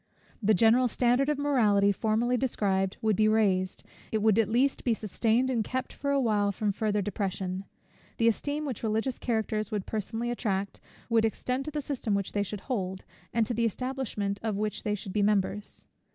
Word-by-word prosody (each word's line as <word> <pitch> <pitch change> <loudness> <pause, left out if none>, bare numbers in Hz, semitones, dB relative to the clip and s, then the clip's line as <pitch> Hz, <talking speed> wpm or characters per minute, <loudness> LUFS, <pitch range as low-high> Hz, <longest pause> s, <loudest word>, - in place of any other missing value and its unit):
The 215 0 +4
general 230 +6 +5
standard 245 +4 +2
of 300 - +1
morality 215 -9 +3
formerly 225 +4 +1
described, 195 -7 0
would 215 -2 +3
be 215 +2 +3
raised, 195 -4 +1 0.3
it 220 - +1
would 220 0 +4
at 225 - +2
least 255 +5 +2
be 235 -3 +2
sustained 225 +4 +1
and 230 -3 +1
kept 255 +4 -3
for 280 - -3
a 280 0 +3
while 210 -5 +2
from 205 +1 -1
farther 210 0 0
depression. 190 -1 -3 0.5
The 230 - +3
esteem 290 +6 0
which 260 -6 -4
religious 225 +3 -1
characters 220 -3 -1
would 210 -3 -3
personally 225 +3 -3
attract, 200 -4 -2 0.3
would 230 -1 +3
extend 250 +4 -1
to 305 - -4
the 300 0 -2
system 250 -7 -2
which 200 -1 -2
they 205 - 0
should 205 0 -4
hold, 190 -7 -3 0.3
and 230 -1 +2
to 240 - -2
the 230 0 +1
establishment 230 -4 -2
of 220 -3 -2
which 210 0 -2
they 210 -1 -1
should 195 -2 -7
be 210 - +1
members. 205 0 0
220 Hz, 190 wpm, -28 LUFS, 205-245 Hz, 0.5 s, general